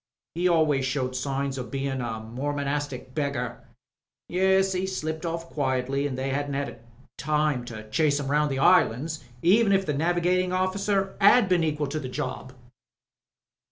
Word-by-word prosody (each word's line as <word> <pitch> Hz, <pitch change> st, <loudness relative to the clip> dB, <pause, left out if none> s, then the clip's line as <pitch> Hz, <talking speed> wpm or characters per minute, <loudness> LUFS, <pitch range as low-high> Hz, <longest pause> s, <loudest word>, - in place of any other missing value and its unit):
He 175 Hz, +3 st, +1 dB
always 155 Hz, -5 st, +3 dB
showed 130 Hz, -1 st, -1 dB
signs 135 Hz, +1 st, -2 dB
o' -, -, -2 dB
bein' 135 Hz, 0 st, -3 dB
a 115 Hz, -2 st, -3 dB
Mormonastic 140 Hz, +2 st, -3 dB
beggar. 130 Hz, -5 st, -2 dB, 0.7 s
Yes, 190 Hz, +1 st, +3 dB
he 185 Hz, +1 st, -1 dB
slipped 160 Hz, -3 st, -3 dB
oflF 165 Hz, 0 st, -2 dB
quietly 135 Hz, 0 st, 0 dB
an' 135 Hz, -, -4 dB
they 135 Hz, +1 st, -2 dB
'adn't 140 Hz, -2 st, -3 dB, 0.4 s
time 150 Hz, -3 st, 0 dB
to 110 Hz, -2 st, -8 dB
chase 150 Hz, +1 st, +2 dB
'im 140 Hz, -1 st, -3 dB
round 150 Hz, 0 st, +2 dB
the 135 Hz, -, -2 dB
islands 155 Hz, -1 st, +3 dB, 0.2 s
even 200 Hz, +5 st, +5 dB
if 195 Hz, 0 st, +3 dB
the 150 Hz, -, -1 dB
navigatin' 175 Hz, +4 st, +1 dB
oflBcer 195 Hz, +1 st, 0 dB
'ad 205 Hz, +2 st, +6 dB
been 180 Hz, -2 st, +2 dB
equal 150 Hz, -1 st, 0 dB
to 145 Hz, +2 st, -3 dB
the 130 Hz, -, -6 dB
job." 130 Hz, 0 st, -5 dB
145 Hz, 155 wpm, -26 LUFS, 135-175 Hz, 0.7 s, ad